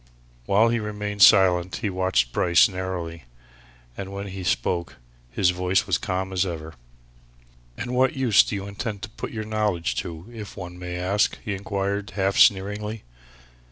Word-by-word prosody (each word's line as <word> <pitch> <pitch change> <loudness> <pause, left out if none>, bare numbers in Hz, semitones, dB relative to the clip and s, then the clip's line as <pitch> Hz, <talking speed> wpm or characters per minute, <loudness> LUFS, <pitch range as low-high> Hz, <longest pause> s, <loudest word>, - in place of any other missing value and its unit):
While 110 +4 +4
he 120 0 +1
remained 105 -1 -4
silent 90 -4 +6
he 105 +2 -2
watched 95 -10 +1
Bryce 85 -2 +5
narrowly, 90 -4 -5 0.7
and 95 0 -6
when 100 0 -5
he 95 0 -6
spoke, 85 +2 -1 0.3
his 90 +9 +2
voice 90 +1 +1
was - - +1
calm 95 +1 -3
as 95 0 +2
ever. 80 -3 -5 1.0
"And 120 +2 -4
what 130 +1 +2
use 125 -6 +5
do - - -3
you 100 0 -4
intend 100 +1 -5
to 120 - -5
put - - -6
your 110 -1 -5
knowledge 105 - -1
to, 85 0 -5
if 105 -4 -9
one 90 -1 -8
may 90 0 -5
ask?" 95 +3 +1
he 105 - -2
inquired, 100 +1 -3
half 95 -1 0
sneeringly. 105 +2 +2
95 Hz, 160 wpm, -24 LUFS, 90-105 Hz, 1.0 s, silent